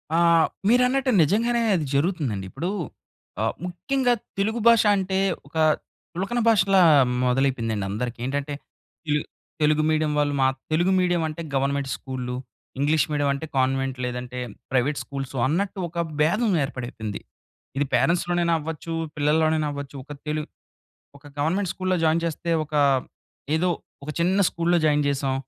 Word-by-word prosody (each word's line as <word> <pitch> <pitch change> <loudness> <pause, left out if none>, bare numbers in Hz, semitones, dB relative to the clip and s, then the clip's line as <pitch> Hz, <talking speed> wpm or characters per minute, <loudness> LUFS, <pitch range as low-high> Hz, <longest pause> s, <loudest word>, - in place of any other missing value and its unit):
ఆ! - - +3 0.5
మీరన్నట్టు 250 +2 +3
నిజంగానే 235 +8 +1
అది 160 -4 -1
జరుగుతుందండి. 140 - 0
ఇప్పుడు 175 - -3 0.7
ఆహ్, 110 - 0
ముఖ్యంగా 245 +8 0 0.3
తెలుగు 220 +4 0
భాష 230 -1 +7
అంటే 190 0 -1 0.3
ఒక 150 - -8 0.6
చులకన 195 +8 -2
భాషలా 195 -3 +4 0.4
మొదలైపోయిందండి 125 -5 0
అందరికి. 120 +4 -4
ఏంటంటే, 145 +2 -2 0.6
ఈల్ 150 0 +2 0.4
తెలుగు 155 0 +3
మీడియం 155 -1 +1
వాళ్ళు 145 -1 +1
మా 130 - +4 0.2
తెలుగు 175 +4 +2
మీడియం 175 -2 +2
అంటే 155 +1 -6
గవర్నమెంట్ 140 0 0
స్కూళ్ళు, 125 -2 -5 0.4
ఇంగ్లీష్ 150 +2 +3
మీడియం 145 -1 +1
అంటే 140 +3 -5
కన్వెంట్ 135 0 +1
లేదంటే, 125 0 -5 0.3
ప్రైవేట్ 135 +3 +1
స్కూల్స్ 135 -1 -6
అన్నట్టు 190 +7 -1
ఒక 170 +1 -2 0.2
బేధం 210 +9 +2
ఏర్పడైపోయింది. 120 -6 -5 0.6
ఇది 145 - +2
పేరెంట్స్‌లోనైనా 170 +6 +2
అవ్వచ్చు, 160 +1 -5 0.2
పిల్లల్లోనైనా 155 +1 +2
అవ్వచ్చు, 140 -1 -7
ఒక 145 - -13 0.2
తెలు 150 0 -1 0.8
ఒక 145 - -18
గవర్నమెంట్ 175 +6 0
స్కూల్‌లో 185 -1 0
జాయిన్ 160 +1 +2
చేస్తే 170 +1 -3
ఒక 150 - -11 0.8
ఏదో 180 +3 +1 0.4
ఒక 150 - -4
చిన్న 190 +4 +2
స్కూల్‌లో 170 +1 +1
జాయిన్ 150 -1 +3
చేసాం. 135 -1 0
155 Hz, 135 wpm, -24 LUFS, 135-180 Hz, 0.8 s, భాష